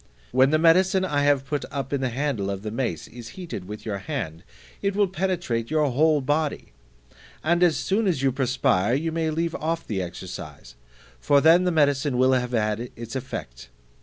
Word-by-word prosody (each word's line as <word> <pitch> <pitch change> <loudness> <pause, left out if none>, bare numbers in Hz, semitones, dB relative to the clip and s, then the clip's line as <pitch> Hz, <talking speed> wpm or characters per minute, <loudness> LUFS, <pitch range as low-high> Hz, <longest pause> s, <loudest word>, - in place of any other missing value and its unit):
When 130 +2 +4
the 155 - +3
medicine 185 +4 +4
I 145 -5 0
have 140 -2 +3
put 145 0 -2
up 140 0 -4
in 140 - 0
the 130 - 0
handle 120 -6 -2
of 100 0 -4
the 105 - -4
mace 115 - -3
is 120 -1 -10
heated 165 - -6
with 105 +2 -8
your 100 -3 -3
hand, 90 - -5 0.4
it 200 -1 0
will 205 -1 +3
penetrate 175 -11 -2
your 150 -3 +2
whole 150 +3 +3
body; 145 +2 -1 0.7
and 170 +2 +2
as 170 -5 +4
soon 205 +2 0
as 160 -8 0
you 135 - +3
perspire, 125 -5 +1
you 160 +4 -1
may 160 0 -1
leave 165 +1 -1
off 165 +2 -2
the 100 -4 -2
exercise, 85 -7 -8 0.5
for 140 - +4
then 165 +5 +5
the 180 - +2
medicine 145 -4 +2
will 130 +1 +4
have 125 -1 0
had 110 +1 -1
its 115 +1 -8
effect. - - -6
140 Hz, 190 wpm, -24 LUFS, 115-160 Hz, 0.7 s, then